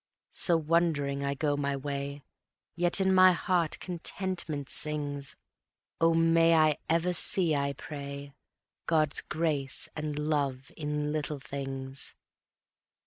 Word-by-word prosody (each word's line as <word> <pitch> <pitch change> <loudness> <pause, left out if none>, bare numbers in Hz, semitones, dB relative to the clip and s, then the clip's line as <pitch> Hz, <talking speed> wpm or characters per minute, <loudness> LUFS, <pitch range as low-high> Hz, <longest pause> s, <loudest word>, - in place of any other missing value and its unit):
So 170 -2 +3
wondering 155 -4 0
I 140 0 -1
go 145 +1 0
my 140 -1 -2
way, 140 0 -5 0.5
Yet 175 +2 +1
in 190 0 +2
my 185 0 +7
heart 170 -2 0
contentment 175 -4 -4
sings... 145 -2 +3 0.6
O 165 0 +3
may 165 0 +4
I 155 -2 +3
ever 170 +2 +1
see, 170 -1 +3
I 140 0 -1
pray, 140 -1 -8 0.5
God's 155 -3 +1
grace 155 -1 0
and 150 -1 -4
love 140 -4 -2
in 150 -1 -3
Little 150 -1 -3
Things. 135 -1 -6
150 Hz, 120 wpm, -29 LUFS, 140-165 Hz, 0.6 s, my